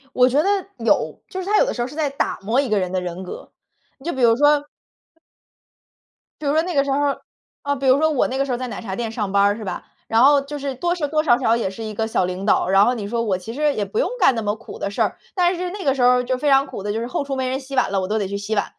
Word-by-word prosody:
我 250 0 +5
觉 280 +4 +3
得， 390 - 0 0.3
有。 - - +1
就 375 - -5
是 370 - -6
他 415 +1 +2
有 - - +5
的 - - -2
时 240 - -4
候 240 - -1
是 295 - -11
在 305 -3 0
打 275 - -2
磨 225 +7 +1
一 275 -4 0
个 210 - +2
人 185 -1 -2
的 185 0 -1
人 180 +1 -5
格， 180 - -9 0.5
你 275 - -18
就 345 - -1
比 265 - -4
如 230 -1 +5
说 290 +1 +3 1.8
比 300 - -5
如 280 - +2
说 315 - +3
那 355 +1 -4
个 275 -1 +3
时 280 - -2
候， 275 - +1 0.7
啊， 285 0 0
比 275 0 -5
如 260 +2 +5
说 315 0 +3
我 290 - +1
那 265 - -3
个 275 - +1
时 270 - -4
候 245 - 0
在 255 0 -4
奶 - - -6
茶 190 -4 -5
店 230 0 -3
上 210 -4 -3
班 200 0 +3
儿 205 +1 +3
是 220 - -8
吧。 195 - -5 0.2
然 225 +2 +3
后 285 0 +6
就 290 +1 -7
是 275 -1 -3
多 345 +7 -1
是 300 -4 -2
多 305 +1 0
少 240 -6 +4
少 230 -3 +2
也 225 -5 -1
是 225 +4 -8
一 215 -1 -5
个 220 +1 -2
小 190 - +1
领 185 +2 -4
导。 205 - +2
然 195 +1 +5
后 245 +3 +2
你 205 -3 -5
说 230 +1 -1
我 200 -5 0
其 205 +5 -8
实 295 +2 +1
也 205 - -1
不 445 - -3
用 - - +1
干 265 - +5
那 225 - -2
么 210 0 -1
苦 230 - -11
的 - - -2
事 200 - 0
儿。 - - -2 0.2
但 355 0 +2
是 360 +1 -3
那 390 0 -6
个 270 - +3
时 270 - -3
候 250 0 +4
就 255 +1 -1
非 290 +2 0
常 270 0 +5
苦 235 - -8
的， 205 - -3
就 220 - -2
是 235 - -3
后 265 - -2
厨 275 -1 -4
没 260 -1 -1
人 260 +1 -1
洗 270 0 -8
碗 255 - +2
了， 195 - +1
我 185 - -3
都 215 +2 0
得 200 - -1
去 200 +1 -4
洗 205 +2 -3
碗。 205 - +1
250 Hz, 350 characters per minute, -21 LUFS, 210-285 Hz, 1.8 s, 后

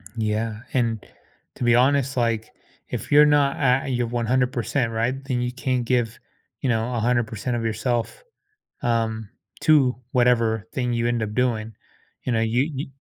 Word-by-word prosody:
Yeah, 110 0 -2
and 115 -4 0 0.5
to - - -5
be 120 0 +4
honest, 135 +1 +2
like, 115 -2 0 0.4
if - - -5
you're 150 +1 +8
not 145 -2 +3
at 135 -1 +2
you're 120 -1 0
100%, 120 +1 0
right, 115 +3 0
then 125 -3 -1
you 125 0 -1
can't 125 -1 -1
give, 120 -2 0 0.4
you 130 - 0
know, 115 +1 0
100% 120 0 0
of 115 - -3
yourself, 115 - -2 0.6
um, 110 -2 -1 0.3
to 140 -5 +4 0.2
whatever 115 -3 +2
thing 125 -2 -1
you 115 0 0
end 120 -1 0
up 105 -1 -4
doing, 115 -3 0 0.5
you 125 - 0
know 115 -1 +1
you 120 +7 +1
you 140 +2 -4
120 Hz, 155 wpm, -23 LUFS, 115-125 Hz, 0.6 s, you're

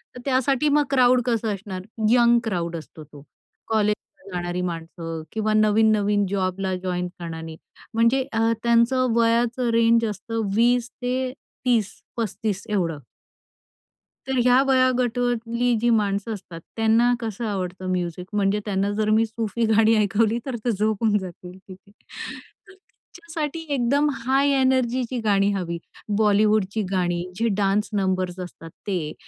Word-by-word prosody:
तर - - -8
त्यासाठी 270 +2 +2
मग 295 +1 +4
क्राउड 255 -2 +4
कसं 225 -3 0
असणार? 190 -2 -6 0.3
यंग 240 0 +5
क्राउड 170 -6 -2
असतो 155 -1 -9
तो. 145 -1 -14 0.5
कॉलेजला 210 -2 -2
जाणारी 175 0 -2
माणसं 165 -1 -5
किंवा 215 0 -1
नवीन-नवीन 210 -1 +3
जॉबला 190 -1 -1
जॉइन 180 -1 -2
करणारे 160 -1 -6 0.4
म्हणजे 230 +4 +3
अ, 225 0 +2
त्यांचं 235 +2 +3
वयाचं 235 +1 +2
रेंज 230 0 +4
असतं 225 +2 -3
20 240 +1 +3
ते 255 +1 -1 0.3
30-35 220 -2 -2
एवढं. 170 -7 -1 1.3
तर 265 -1 -1
ह्या 250 +1 +5
वयोगटातली 245 -2 +1
जी 240 - +2
माणसं 210 0 +1
असतात, 180 -4 -9 0.2
त्यांना 225 +2 +3
कसं 225 0 -4
आवडतं 185 -2 -4
म्युझिक? 180 0 -3
म्हणजे 205 0 +1
त्यांना 200 0 0
जर 215 0 +1
मी 220 +1 +4
सूफी 225 +1 -2
गाणी 225 +1 +5
ऐकवली 215 +2 +2
तर 260 -3 -3
ते 240 - +2
झोपून 215 +1 +1
जातील 180 0 -9
तिथे. 190 +1 -14
तर 390 - -12
त्यांच्यासाठी 330 -4 -7
एकदम 280 +4 +2
हाय 270 +3 +1
एनर्जीची 255 -1 +1
गाणी 200 -1 +3
हवी. 170 -3 -3 0.4
बॉलिवूडची 210 0 +2
गाणी 175 -2 0 0.2
जे 230 - +2
डान्स 205 +1 +1
नंबर्स 185 -2 -1
असतात 175 -2 -8 0.2
ते. 175 -6 -2
215 Hz, 130 wpm, -23 LUFS, 190-240 Hz, 1.3 s, यंग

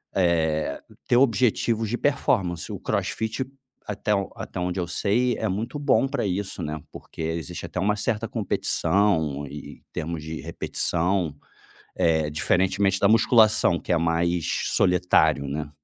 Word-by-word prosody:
eh, 80 -5 +1 0.3
ter 120 - +4
objetivos 115 -2 +2
de 120 - -1
performance. 95 - 0
O - - -5
CrossFit, 110 +4 -2 0.4
até 105 +1 0
o 100 -1 -2
até - - -7
onde 90 +1 -2
eu 85 - -2
sei, 120 +6 +1
é 110 - -1
muito 115 +9 -3
bom 140 -1 +3
pra 135 -4 -2
isso, 95 +1 -3
né, 75 0 -4
porque - - -10
existe 85 +2 -4
até - - -5
uma 105 +3 +1
certa 115 +1 -1
competição 95 - 0
em 75 +1 -9
em - - -37
termos 80 0 -4
de 80 0 -6
repetição, 85 -3 0 0.6
eh, 80 -2 +2
diferentemente 95 +4 +1
da 100 - +4
musculação, 110 -6 +4
que - - -5
é - - +3
mais 85 0 0 0.3
solitário, 90 -5 +3
né? 75 +1 -4
90 Hz, 150 wpm, -25 LUFS, 80-110 Hz, 0.6 s, ter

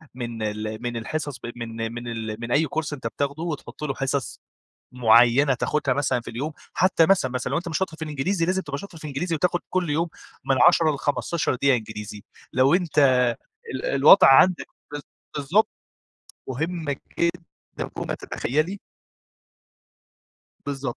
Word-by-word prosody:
من 120 -3 -5
ال 110 +1 -4
من 120 -1 -3
الحصص 145 +3 -4
ب 120 - -6
من 115 -1 -5
من 120 0 -7
ال 110 -2 -4
من 120 0 -5
أي 150 +5 +3
كورس 155 -1 -3
أنت 130 -5 -4
بتاخده 140 +7 -3
وتحُط 150 -2 -6
له 145 -2 -1
حصص 135 0 -2 0.5
معيّنة 125 +3 +5
تاخدها 140 0 0
مثلًا 135 -3 0
في 115 - -9
اليوم 140 +7 -4 0.2
حتّى 180 -3 +4
مثلًا، 180 -9 +3
مثلًا 125 0 -3
لو 140 - 0
أنت 175 - -5
مش 160 - -1
شاطر 190 -4 -3
في 160 - -11
الإنجليزي 160 +4 -1
لازم 190 +1 0
تبقى 145 -4 -5
شاطر 190 -2 -10
في 155 - -14
الإنجليزي 155 +4 -2
وتاخد 175 +2 +1
كل 185 -4 0
يوم 165 +4 0 0.4
من 135 - +2
10 165 -2 +3
ل15 145 +2 -1
دقيقة 135 +1 +3
إنجليزي. 105 -2 -7 0.3
لو 135 +4 +4
أنت 175 -4 -1 0.8
ال 130 - -4
الوضع 140 +5 +7
عندك 175 +7 +5 0.3
بالظ 145 - -5 0.3
بالضبط. 155 +10 +2 0.8
مهمة 155 +2 -2 0.2
جدًا 170 0 -3
فوق - - -4
ما - - -2
تتخيّلي. 155 +10 -2 1.9
بالضبط، 135 -3 -4
140 Hz, 160 wpm, -24 LUFS, 120-165 Hz, 1.9 s, الوضع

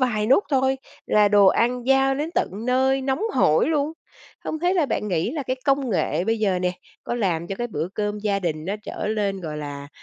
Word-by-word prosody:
vài 215 -5 +1
nút 270 - +4
thôi 265 -1 +2 0.3
là 210 -1 +4
đồ 205 -1 +5
ăn 245 +4 +2
giao 270 0 +4
đến 300 +4 -3
tận - - +1 0.2
nơi 265 +1 +2
nóng 265 +8 -1
hổi 160 - +3
luôn, 300 0 0 0.5
không 315 - -3
thế 355 +3 +1
là 325 -6 +2
bạn 210 - -2
nghĩ 175 +4 0
là 295 -1 -3
cái 255 0 -2
công 275 -2 +1
nghệ 170 -2 0
bây 225 +1 0
giờ 195 -4 +1
nè 180 0 0 0.3
có - - -2
làm 175 -8 -1
cho 195 - -4
cái 240 - -2
bữa 165 -6 -3
cơm 210 0 -2
gia 205 -1 0
đình 155 -4 -3
nó 195 +4 -2
trở 210 - -5
lên, 205 -3 -1
gọi 155 -3 -5
là, 145 -1 -6
215 Hz, 225 wpm, -23 LUFS, 185-265 Hz, 0.5 s, đồ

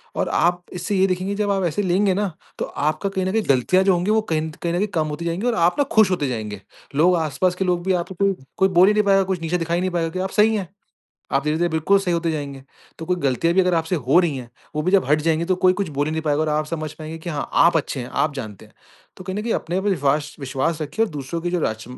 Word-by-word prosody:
और - - -1
आप 175 +1 +1
इससे 180 +3 -3
ये 190 0 +4
देखेंगे 185 +2 -2
जब 205 0 0
आप 195 -1 0
ऐसे 175 +5 -1
लेंगे 190 +2 +2
ना, 200 0 -1 0.3
तो - - -1
आपका 155 +7 -2
कहीं 190 -1 -2
न 190 - 0
कहीं 220 +2 +1
गलतियाँ 140 +8 +3
जो 190 -1 +4
होंगी 180 +4 0
वो 220 0 +3
कहीं 155 - +1
न 160 - -4
कहीं 175 +4 0
कम 155 - 0
होती 150 +3 -5
जाएँगी 170 +8 -1
और 240 - +1
आप 170 -2 +3
ना - - +5
खुश 215 -3 +5
होते 160 -6 0
जाएँगे। 105 -4 -5 0.3
लोग 175 +5 +4
आस-पास 160 +3 0
के 190 - -1
लोग 175 -1 0
भी 190 - +2
आपको 180 +1 -3
कोई 195 +1 +1 0.2
कोई 190 - +3
बोल 185 0 +5
ही 210 - +4
नहीं 210 0 +3
पाएगा 195 -1 +4
कुछ 190 -2 -3
नीचे 165 +2 0
दिखा 165 -1 -3
ही 175 - +1
नहीं 185 - 0
पाएगा 170 -2 -1
कि 185 - -5
आप 190 +1 -1
सही 220 +1 +5
हैं। 195 -5 -3 0.6
आप 135 +1 +1
धीरे-धीरे 160 +3 +1
बिल्कुल 160 +5 +3
सही 185 -3 -1
होते 170 0 0
जाएँगे। 140 -3 -5 0.4
तो 165 - -6
कोई 180 - +1
गलतियाँ 165 +2 0
भी 190 - +5
अगर 180 -1 +2
आपसे 165 +2 0
हो 140 +2 +3
रही 165 -6 0
हैं, 125 -2 -8 0.3
वो 155 - 0
भी 180 +4 0
जब 195 - +4
हट 150 +1 +4
जाएँगे 165 +1 +1
तो 185 +2 +1
कोई 185 0 +4
कुछ 190 0 -2
बोल 145 -1 -1
ही 155 - -2
नहीं 160 0 -2
पाएगा 150 -1 +1
और 155 - -1
आप 150 0 0
समझ 155 -1 -4
पाएँगे 160 +1 -8
कि 170 +2 -6
हाँ, 150 -3 -3
आप 170 0 +5
अच्छे 145 -3 -2
हैं, 120 - -6
आप 145 -2 0
जानते 110 -8 -7
हैं। - - -25 0.4
तो 185 - -10
कहीं 190 +1 -4
न - - -3
कहीं 230 0 -1
अपने 175 +3 -2
पे 205 - -1
विश्वास 145 -3 0
विश्वास 140 +4 -2
रखिए 185 +9 0
और - - -6
दूसरों 145 +3 -4
की 175 +1 -2
जो 175 -1 0
राच 110 -6 -2
170 Hz, 290 wpm, -22 LUFS, 155-190 Hz, 0.6 s, ना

